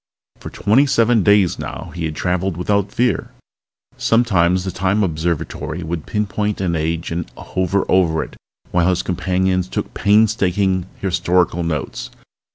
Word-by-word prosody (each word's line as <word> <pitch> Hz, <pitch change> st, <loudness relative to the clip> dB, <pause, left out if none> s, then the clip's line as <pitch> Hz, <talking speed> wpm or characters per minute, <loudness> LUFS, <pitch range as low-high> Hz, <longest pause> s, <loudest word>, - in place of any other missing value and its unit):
For -, -, -8 dB
twenty 125 Hz, +8 st, +3 dB
seven 115 Hz, -3 st, +3 dB
days 100 Hz, -2 st, +3 dB
now -, -, -6 dB
he 85 Hz, -2 st, -3 dB
had 80 Hz, -1 st, -4 dB
traveled 90 Hz, +1 st, -1 dB
without 100 Hz, +2 st, 0 dB
fear. 125 Hz, +1 st, 0 dB, 0.7 s
Sometimes 95 Hz, -6 st, +2 dB
the 95 Hz, -, -3 dB
Time 95 Hz, +3 st, +1 dB
Observatory 85 Hz, 0 st, -2 dB
would 80 Hz, -1 st, -4 dB
pinpoint 105 Hz, 0 st, -1 dB
an 90 Hz, -3 st, 0 dB
age 80 Hz, +1 st, -2 dB
and 85 Hz, 0 st, -3 dB
hover 95 Hz, +1 st, -1 dB
over 85 Hz, -4 st, +2 dB
it -, -, -11 dB, 0.4 s
while 90 Hz, 0 st, +2 dB
his 90 Hz, -, 0 dB
companions 90 Hz, 0 st, 0 dB
took -, -, -4 dB
painstaking 100 Hz, -3 st, +2 dB
historical 90 Hz, -2 st, +1 dB
notes. 80 Hz, -6 st, -3 dB
95 Hz, 140 wpm, -19 LUFS, 85-100 Hz, 0.7 s, twenty